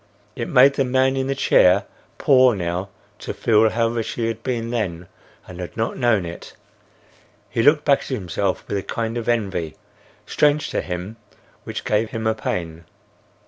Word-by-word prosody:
It - - -4
made 135 +2 +6
the 135 - +1
man 130 +1 +2
in 135 0 -1
the 135 - -1
chair 100 -6 +4 0.3
poor 130 -4 +5
now 90 +1 -3 0.3
to - - -6
feel 110 -1 +3
how 115 +1 +1
rich 115 -1 -3
he 115 - -2
had 115 0 -3
been 115 -2 -3
then 90 -8 -3 0.4
and 90 -1 -10
had 90 +4 -7
not 115 0 -1
known 120 -7 +1
it. 85 0 -9 1.0
He - - 0
looked 145 +4 +4
back 140 -2 +4
at - - -10
himself 100 -5 -2
with 100 - -2
a - - -2
kind 115 +3 -4
of 120 -1 -3
envy, 95 -9 -1 0.5
strange 150 0 +1
to - - -1
him, 90 +5 -6 0.5
which - - -6
gave 110 +1 +1
him 110 -1 -5
a 110 - +2
pain. 85 -6 -4
115 Hz, 180 wpm, -21 LUFS, 95-125 Hz, 1.0 s, made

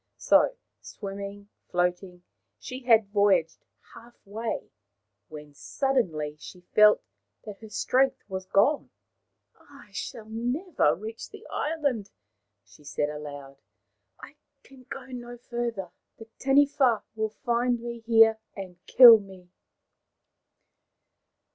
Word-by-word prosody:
So, - - +3 0.3
swimming, 200 0 -8 0.2
floating, 180 0 -2 0.3
she 255 - -8
had 220 -4 +4
voyaged 195 -6 +2 0.3
half 235 +1 -15
way, 220 +3 -5 0.6
when 150 -1 -11
suddenly 160 - -2
she 180 - -12
felt 210 0 +6 0.4
that 210 -2 -10
her 220 - -12
strength 260 +5 +1
was 190 -1 -6
gone. 280 +12 +2 0.5
" - - -53 0.2
I 210 - -17
shall 215 +2 -7
never 240 - 0
reach 220 +3 -8
the - - -13
island," 285 -10 -2 0.6
she - - -20
said 145 +1 -2
aloud. 145 -2 -9 0.3
" 105 0 -52
I 295 - -13 0.3
can 260 -2 -18
go 270 -1 -7
no 245 -2 -9
farther. 235 -6 -5 0.3
The 225 - -11
Taniwha 270 -4 +3
will 220 -1 -3
find 240 0 +1
me 235 0 -7
here 225 -1 +4 0.2
and 185 -2 -10
kill 235 -3 +9
me." 190 -3 -15
220 Hz, 115 wpm, -27 LUFS, 185-245 Hz, 0.6 s, kill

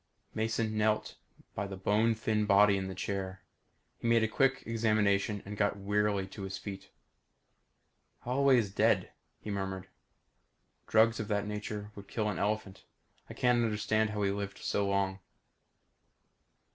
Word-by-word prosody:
Mason 110 0 -1
knelt 110 0 +1 0.4
by 100 - -3
the 95 0 -7
bone 105 +4 +2
thin 110 -1 0
body 100 0 +6
in 95 -1 -2
the 95 - -6
chair. 95 0 -4 0.6
He - - -3
made 115 -1 +4
a - - +3
quick 135 +5 +1
examination 105 -3 +1
and 105 +1 -6
got 100 0 +1
wearily 100 0 0
to 100 - -9
his 95 0 -4
feet. 100 -2 -8 1.3
"Holloway 130 +1 +3
is 105 -5 0
dead," - - +2 0.3
he 105 - -5
murmured. 95 -1 -4 1.0
"Drugs 115 +1 +4
of 110 - -3
that 105 -1 0
nature 105 0 -5
would 100 -1 -11
kill 105 -2 -1
an 105 - -3
elephant. 105 -2 -2 0.5
I - - -8
can't 125 -1 +3
understand 110 0 +1
how 105 -1 -2
he 100 - +2
lived 100 0 -4
so 100 -1 -1
long." 95 -1 0
105 Hz, 150 wpm, -31 LUFS, 100-110 Hz, 1.3 s, body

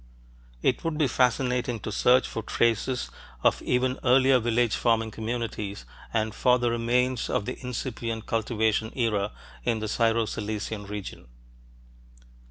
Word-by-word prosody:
It - - +1
would 165 -2 -1
be 155 - +3
fascinating 125 -1 +1
to - - -4
search 125 +4 +4
for 115 - -4
traces 115 - 0 0.3
of - - +3
even 125 +1 0
earlier 130 +1 +5
village 120 -1 +1
farming 115 -2 +1
communities 110 - -4 0.3
and 110 -1 0
for 125 -1 +3
the 120 -1 0
remains 125 +2 +1
of 100 - 0
the 125 - -5
incipient 115 -2 -4
cultivation 110 -1 0
era, 105 -4 0 0.3
in 115 -2 +1
the 110 0 -3
Syro 115 +1 +2
Cilician 105 -1 -4
region. 100 -10 -7
115 Hz, 135 wpm, -27 LUFS, 110-125 Hz, 0.3 s, earlier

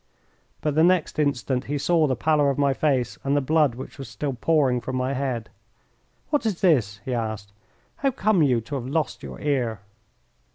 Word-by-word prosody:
But 150 -1 0
the 160 +2 +4
next 175 -3 +2
instant 135 -3 0
he 145 - -2
saw 160 +2 +2
the 130 - 0
pallor 150 +2 +2
of 140 - -1
my 140 -1 +3
face 130 -4 0
and 140 +1 +1
the - - +4
blood 150 -2 +2
which 130 +3 -9
was 135 - -7
still 145 -2 -3
pouring 130 -2 +2
from 130 +3 -4
my 130 +1 -1
head. 130 -4 -3 0.8
"What 295 - +2
is 215 -6 -2
this?" 120 - +2
he 130 - -2
asked. 110 -4 -4 0.4
"How 275 - +1
come 215 -6 +2
you 125 -6 +3
to 125 +6 -10
have 130 -3 -3
lost 155 +3 -1
your - - -8
ear?" 125 -8 -1
140 Hz, 195 wpm, -24 LUFS, 125-155 Hz, 0.8 s, the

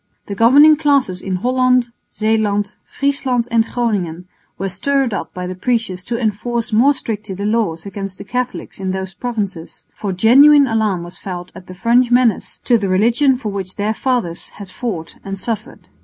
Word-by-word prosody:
The 200 - -5
governing 285 +9 +6
classes 280 -12 +1
in 190 -1 -3
Holland, 250 +3 +2 0.2
Zeeland, 215 -2 0 0.2
Friesland 270 -4 0
and 230 -1 +4
Groningen 195 -9 -2 0.3
were 195 - -2
stirred 265 +6 0
up 170 -4 -4
by 180 0 -6
the 180 - -4
preachers 190 -2 -2
to 235 - -2
enforce 230 +1 -2
more 270 +7 +4
strictly 215 -5 -5
the 200 +2 -4
laws 210 -7 -1
against 195 -1 -6
the - - -8
Catholics 250 +2 -4
in 190 -1 -2
those 190 0 -4
provinces, 200 -6 -5
for 200 - -4
genuine 275 +10 +6
alarm 215 -7 0
was 175 0 -10
felt 180 -2 -7
at 185 0 -12
the 185 - -10
French 240 +5 +3
menace 245 -4 +2
to 240 -3 +3
the 200 -2 -2
religion 235 +8 +3
for 245 -4 -5
which 190 -2 -5
their 210 +1 -1
fathers 235 -9 -2
had 200 -2 -11
fought 190 -10 -5
and 195 0 -5
suffered. 215 +2 -5
215 Hz, 175 wpm, -18 LUFS, 190-245 Hz, 0.3 s, governing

